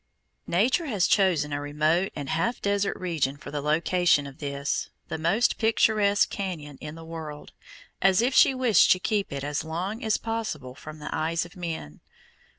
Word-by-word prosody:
Nature 255 - +2
has 205 -8 +1
chosen 175 -7 +2
a 145 - -2
remote 155 +5 +1
and 145 -2 -5
half 230 +10 0
desert 200 0 0
region 155 -7 -1
for 145 - -10
the 145 -1 -3
location 160 +1 +2
of 140 +2 -10
this, 140 -1 -2 0.2
the - - -3
most 185 +10 +2
picturesque 210 -2 +3
cañon 165 -8 -5
in 150 0 -7
the 165 0 -10
world, 160 -2 -8 0.5
as 190 +1 +4
if 245 +3 +2
she 265 - +6
wished 250 -5 +4
to - - +6
keep 200 +2 -1
it 140 -1 -4
as 145 0 -2
long 185 +9 -4
as 220 -1 +2
possible 215 - -4
from 155 +3 -10
the 150 - -5
eyes 165 +2 0
of 175 - -14
men. 165 - -6
170 Hz, 175 wpm, -26 LUFS, 150-205 Hz, 0.5 s, she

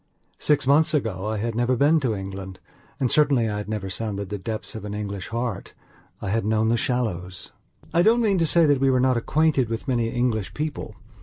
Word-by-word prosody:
Six 145 -2 +2
months 155 +4 +4
ago 105 -8 -2
I 110 0 -2
had 115 +2 -2
never 120 +2 +1
been 145 +6 +4
to 125 -7 -1
England, 95 -1 -7 0.4
and, 130 -3 +1
certainly, 140 -6 +3
I 105 -1 -2
had 105 0 -6
never 105 -3 -3
sounded 100 -1 -4
the 105 -1 -4
depths 110 +3 -4
of 110 - -7
an 105 0 -5
English 100 -3 -5
heart. 115 -2 -4 0.5
I 100 - -2
had 115 +2 0
known 110 +1 +1
the 115 - +3
shallows. 95 -8 -2 0.4
I 170 - +4
don't 225 +6 +4
mean 205 -5 +2
to 165 - +2
say 170 +1 +4
that 145 -3 +3
we 135 - +4
were 130 -1 +3
not 130 0 +3
acquainted 140 0 +1
with 115 +4 -4
many 120 -3 +1
English 115 -4 -1
people. 145 -7 -4
115 Hz, 215 wpm, -24 LUFS, 105-140 Hz, 0.5 s, months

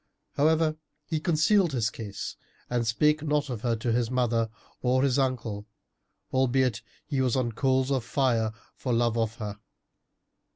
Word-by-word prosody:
However 155 +1 +2 0.3
he 155 +1 -1
concealed 170 +2 +3
his 115 -2 +1
case 105 -5 -6 0.4
and 120 -2 0
spake 150 +7 +3
not 150 -2 0
of 115 -4 -4
her 120 -1 +1
to 115 +1 -1
his 115 0 +1
mother 120 -3 +1 0.3
or 130 +1 +2
his 140 0 +2
uncle, 115 -6 -1 0.7
albeit 130 -2 +2 0.2
he 140 -4 -1
was 125 -3 +2
on 125 -3 0
coals 130 +3 +1
of 130 -3 +1
fire 115 -4 +1 0.2
for 125 - -2
love 115 -1 +2
of 115 -1 0
her. 105 -3 -6
125 Hz, 155 wpm, -27 LUFS, 115-140 Hz, 0.7 s, concealed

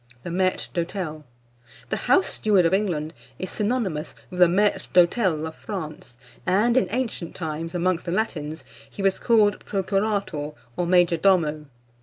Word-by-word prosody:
THE 175 - -5
MAÎTRE 185 +1 0
D'HÔTEL. 170 -3 -3 0.7
The - - +2
house 375 - +5
steward 200 -5 +2
of 165 - +2
England 170 -6 0 0.2
is 185 - -4
synonymous 205 -8 -1 0.2
with 180 - -6
the 180 - +8
maître 200 +4 +1
d'hôtel 175 -3 +3
of 160 - -7
France; 155 - -7 0.3
and, 210 +6 +2
in 260 - +3
ancient 230 -9 -3
times, 165 0 -4
amongst 180 0 0
the - - -1
Latins, 160 -7 -2 0.3
he 200 - -6
was 195 -1 +2
called 215 -4 +3
procurator, 195 -6 -1 0.2
or 175 - -1
major 175 -1 +4
domo. 160 -5 +2
180 Hz, 150 wpm, -24 LUFS, 160-205 Hz, 0.7 s, the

